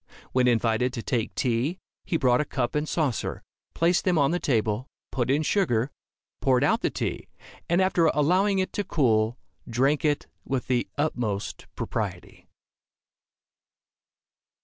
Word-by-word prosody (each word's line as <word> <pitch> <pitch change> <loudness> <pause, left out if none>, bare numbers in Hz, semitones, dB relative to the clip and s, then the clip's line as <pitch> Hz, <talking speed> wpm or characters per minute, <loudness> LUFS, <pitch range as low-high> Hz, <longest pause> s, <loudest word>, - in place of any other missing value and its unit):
When 125 -1 +3
invited 120 +1 +2
to 115 -4 -4
take 115 -4 -1
tea, 130 +7 0 0.3
he 165 - 0
brought 125 -2 +3
a - - +1
cup 130 -4 -2
and 150 +1 -1
saucer, 150 -8 -1 0.3
placed 170 +2 +2
them 180 -3 +2
on 140 -1 +3
the 175 - 0
table, 115 -2 0 0.2
put 125 -1 -1
in 145 +3 +2
sugar, 140 - +1 0.5
poured 130 -1 +3
out 225 +11 +2
the - - +1
tea, - - -3 0.4
and 170 +2 +3
after 185 -3 +3
allowing 185 +7 +3
it 185 0 -1
to 205 - -1
cool, 115 - +2 0.3
drank 135 +6 +2
it 150 -2 +1 0.2
with 130 -2 -2
the 125 -2 0
utmost 120 -9 -2
propriety. - - -5
135 Hz, 145 wpm, -26 LUFS, 120-165 Hz, 0.5 s, When